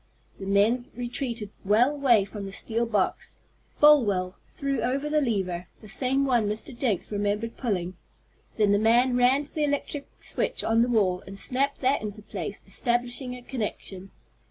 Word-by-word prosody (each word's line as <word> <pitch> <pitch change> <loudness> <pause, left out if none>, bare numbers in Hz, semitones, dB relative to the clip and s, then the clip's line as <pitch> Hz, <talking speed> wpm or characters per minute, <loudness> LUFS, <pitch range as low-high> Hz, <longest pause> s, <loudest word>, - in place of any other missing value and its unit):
The 195 - -6
men 215 +5 +3
retreated 240 -3 -4
well 220 +7 +4
away 255 -8 +3
from 200 0 -7
the - - -7
steel 230 +3 -1
box. 210 -4 -1 0.4
Folwell 205 -12 +5
threw 275 -1 -2
over 275 +4 -1
the 300 0 +2
lever 190 -8 -1
the 215 - -13
same 265 +5 0
one 240 -5 +2
Mr. 215 +4 -4
Jenks 230 -7 -1
remembered 205 +2 -1
pulling. 185 -7 -2 0.6
Then 210 -2 +3
the 205 - +4
man 240 +3 +4
ran 250 +3 +4
to 290 - -12
the 305 - 0
electric 285 0 -2 0.2
switch - - -1
on 225 +1 +3
the 240 - +2
wall, 190 -6 +2
and 195 +1 -8
snapped 275 +6 -1
that 265 +1 +2
into 210 0 -6
place, - - -6
establishing 245 +1 -1
a 250 - -11
connection. 205 -6 -5
230 Hz, 165 wpm, -26 LUFS, 205-260 Hz, 0.6 s, Folwell